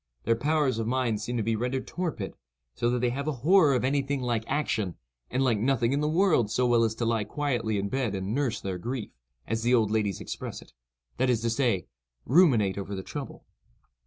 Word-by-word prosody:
Their 115 - +2
powers 145 -1 +1
of 110 - -2
mind 120 -4 0
seem 120 0 -3
to 115 - 0
be 115 +1 0
rendered 125 +4 -2
torpid, 160 - -4 0.4
so 120 - 0
that 125 0 0
they 125 -1 +2
have 140 +4 -4
a - - +2
horror 165 -6 +6
of 125 - 0
any 140 +2 +2
thing 140 +1 -2
like 120 -3 -1
action, 110 - -1 0.3
and 130 - 0
like 120 -5 +2
nothing 120 +1 +1
in 140 - +1
the 150 0 +1
world 160 - +3
so 125 +3 +1
well 120 -1 +4
as 110 -1 0
to 120 - -2
lie 115 -2 +1
quietly 115 -2 -1
in 100 0 -1
bed 120 -3 -1
and 95 +2 -3
"nurse 125 -4 0
their 95 -2 -4
grief," 120 +3 -4 0.3
as 115 0 -2
the 120 +2 +3
old 110 -3 +2
ladies 105 -4 0
express - - -6
it—that - - -6
is 120 -3 +2
to 115 0 0
say, 115 - +1 0.4
ruminate 120 - +4
over 100 0 -5
the 95 - -5
trouble. - - -7
120 Hz, 220 wpm, -28 LUFS, 110-135 Hz, 0.4 s, horror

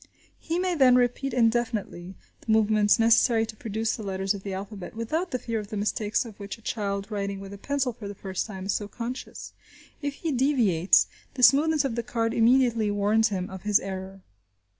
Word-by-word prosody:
He 330 +1 -3
may 365 0 0
then 260 -6 +5
repeat 250 +2 +1
indefinitely 225 -6 -1 0.3
the 225 - -2
movements 215 -1 +4
necessary 225 0 +4
to 220 -1 -9
produce 220 +1 -2
the 225 - -8
letters 195 -1 -1
of 200 - -7
the 195 - -6
alphabet, 195 +1 -7
without 310 +11 -2
the 255 - -1
fear 230 -2 -3
of 210 - -7
the 215 0 -5
mistakes 210 +2 -1
of 220 -3 -11
which 200 +1 -6
a - - -20
child 200 -2 -3
writing 200 -1 -3
with 195 0 -9
a 200 - -10
pencil 275 0 -1
for 215 -3 -9
the 200 - -7
first 190 0 -4
time 190 -3 -7
is 195 - 0
so 205 - -2
conscious. 245 +4 -7 0.5
If 285 -1 -3
he 325 +1 -3
deviates, 240 - +3 0.3
the 255 - -2
smoothness 295 +4 +5
of 265 - -1
the 235 - -1
card 230 -1 -2
immediately 235 -2 +3
warns 205 +2 +2
him 185 -3 -3
of 190 -1 -8
his 210 -1 +3
error. 190 0 -7
220 Hz, 205 wpm, -26 LUFS, 200-245 Hz, 0.5 s, then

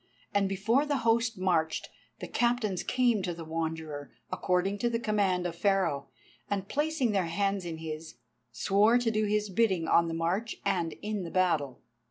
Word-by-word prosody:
And 200 -1 +2
before 215 +8 +2
the 290 -1 +1
host 230 0 +2
marched, 170 -4 0 0.3
the - - -4
Captains 235 -6 +1
came 245 -4 +2
to 175 -2 -3
the 165 -1 -8
Wanderer, 160 -2 -4 0.2
according 190 +2 0
to 240 - +1
the 230 - 0
command 200 -5 +1
of 170 -1 -3
Pharaoh, 185 -7 +1 0.4
and 195 -1 -2
placing 295 -3 0
their 190 -4 +1
hands 195 +2 0
in 165 -2 -4
his, 160 -2 -7 0.4
swore 205 - +3
to 240 -2 +1
do 215 0 +1
his 210 -1 0
bidding 190 -5 +2
on 170 0 +4
the 165 - -3
march 185 +8 -1
and 170 -4 0
in 210 -1 -2
the 170 - -5
battle. 160 -8 +1
195 Hz, 175 wpm, -29 LUFS, 165-215 Hz, 0.4 s, on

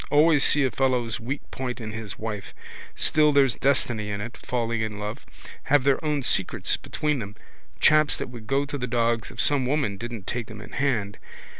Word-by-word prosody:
Always 150 0 +5
see 145 - +5
a 130 - +1
fellow's 125 -5 0
weak 130 +5 -4
point 125 -1 -4
in 110 -2 -5
his 110 -2 -6
wife. 105 -2 -6 0.4
Still 150 -1 +4
there's 140 -3 +4
destiny 120 -6 0
in 100 -1 -3
it, 120 +4 -6
falling 115 -2 -2
in 110 -1 -3
love. 105 +1 -6 0.4
Have 145 -1 +4
their 140 +2 +2
own 150 -3 0
secrets - - 0
between 150 -2 -2
them. 100 -2 -7 0.4
Chaps 155 -1 +4
that - - -5
would 115 -3 -10
go 140 +2 +1
to 145 0 -5
the 125 - -2
dogs 115 -2 0
if 125 - -12
some 135 -1 +3
woman 135 -8 0
didn't 115 -4 -6
take 120 -3 -3
them 110 -2 -9
in - - -11
hand. 115 -8 -1
125 Hz, 195 wpm, -25 LUFS, 110-140 Hz, 0.4 s, Always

